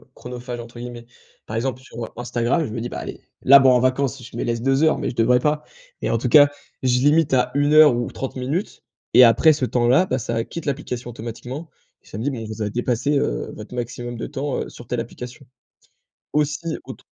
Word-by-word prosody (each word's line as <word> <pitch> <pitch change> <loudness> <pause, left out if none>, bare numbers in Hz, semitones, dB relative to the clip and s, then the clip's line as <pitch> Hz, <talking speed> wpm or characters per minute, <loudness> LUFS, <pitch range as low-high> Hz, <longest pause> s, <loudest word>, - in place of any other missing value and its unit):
«chronophages» 125 0 -7
entre 120 0 -11
guillemets. 120 -1 -8 0.4
Par 110 - -3
exemple, 130 +2 -2
sur 130 - -14 0.2
Instagram, 120 +6 0
je - - -5
me 115 - -4
dis: 120 - -3
«Bah, - - -5
allez, - - -7 0.2
là, 140 +1 +9
bon, 135 -1 +6
en 125 -1 +4
vacances, 130 0 0
je 125 - -10
me - - -1
laisse 115 -1 -1
2 135 +3 +2
heures» 155 - +4
mais - - -2
je - - -7
devrais 120 +2 +4
pas. 150 +3 0 0.4
Et - - -1
en 115 - +2
tout 125 +2 -2
cas, 145 +2 +8 0.3
je 125 -1 +2
limite 145 +2 +3
à 125 -1 +2
1 145 +1 +2
heure 155 -3 +8
ou 120 0 -2
30 135 0 -6
minutes, 140 +10 -3 0.3
et 125 - +9
après 120 +7 +6
ce 145 -4 0
temps-là, 125 +7 +3
bah, 130 - -1
ça 115 -2 -3
a 115 - 0
quitte 170 - -7
l'application 125 -4 -4
automatiquement 120 +6 -7 0.3
et - - -24
ça - - -8
me 110 - -4
dit: 145 - +1
«Bon, 115 -4 -5
vous 110 0 -7
avez 105 -1 -1
dépassé, 120 +5 0
heu, - - -1
votre - - -9
maximum 120 0 -5
de 115 - -5
temps, 145 0 -3
heu, - - -5
sur 120 - -13
telle 120 -2 -1
application». 125 +3 -9 0.9
Aussi, 150 +2 -1
autre - - -10
125 Hz, 230 wpm, -22 LUFS, 120-140 Hz, 0.9 s, là